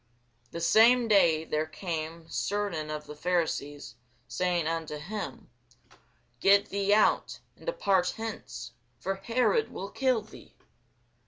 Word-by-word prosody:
The 170 - -6
same 235 +7 +5
day 170 -7 +4
there 155 0 -1
came 165 -1 -5
certain 195 -7 -2
of 150 0 -5
the 150 - -8
Pharisees, 145 -8 -2 0.3
saying 175 +6 0
unto 160 -2 -3
him, 195 +8 -6 0.9
Get 200 +1 +5
thee 200 0 0
out, 210 +1 +3 0.2
and - - -17
depart 195 - +1
hence: 220 - -6 0.3
for 190 +11 -2
Herod 250 - +1
will 195 - -6
kill 255 -5 +1
thee. 215 - -15
180 Hz, 120 wpm, -29 LUFS, 155-210 Hz, 0.9 s, same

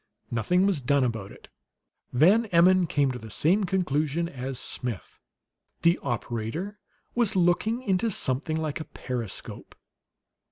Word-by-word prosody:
Nothing 150 - +2
was 190 -8 +1
done 140 +2 +2
about 110 -5 -2
it. - - -15 0.6
Van 190 - +4
Emmon 180 0 +5
came 145 -3 +1
to 125 - -6
the 110 - -10
same 185 - +2
conclusion 170 -3 0
as 135 -4 -5
Smith; 120 -5 -5 0.6
the 170 +1 +4
operator 120 - -3 0.3
was 235 -5 +2
looking 190 +7 +2
into 195 +1 +1
something 155 -3 -1
like 155 -1 -2
a 155 - -5
periscope. 120 -6 -6
155 Hz, 130 wpm, -27 LUFS, 125-185 Hz, 0.6 s, Emmon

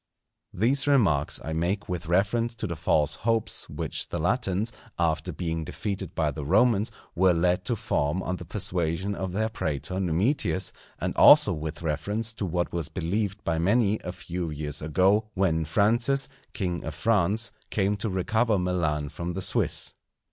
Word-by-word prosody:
These 130 +9 +2
remarks 95 - +3
I 80 - -3
make 90 +6 -1
with 90 -2 -4
reference 115 +7 +1
to 110 - -4
the 85 -4 -3
false 75 -2 +1
hopes 115 +4 0
which - - -4
the - - -3
Latins, 105 +3 0 0.2
after 85 +1 0
being 80 0 -3
defeated 100 +3 -5
by 80 -2 +1
the 75 0 -6
Romans, 105 - +3 0.2
were 90 0 +4
led 90 +2 +1
to 120 - +1
form 95 -6 -1
on 90 - -2
the 90 - -9
persuasion 90 +1 -1
of 95 -2 -4
their 110 +4 0
prætor 90 -2 -3
Numitius, 95 - 0 0.3
and - - -2
also - - +8
with 80 +1 -5
reference 105 +9 -1
to 100 -3 -3
what 85 +1 -1
was 85 -4 -2
believed 100 +3 -2
by 80 -1 0
many 105 +4 +2
a 90 - -5
few 90 -1 -5
years 75 -1 -4
ago, 95 +8 +2
when 85 -4 +1
Francis, 115 - +2 0.3
king 90 -4 -2
of 80 - -5
France, 105 +4 +1 0.2
came 100 0 +1
to 105 +2 -2
recover 110 +4 +1
Milan 85 -5 0
from 85 +4 -5
the 95 - -3
Swiss. - - +1
90 Hz, 165 wpm, -26 LUFS, 80-105 Hz, 0.3 s, also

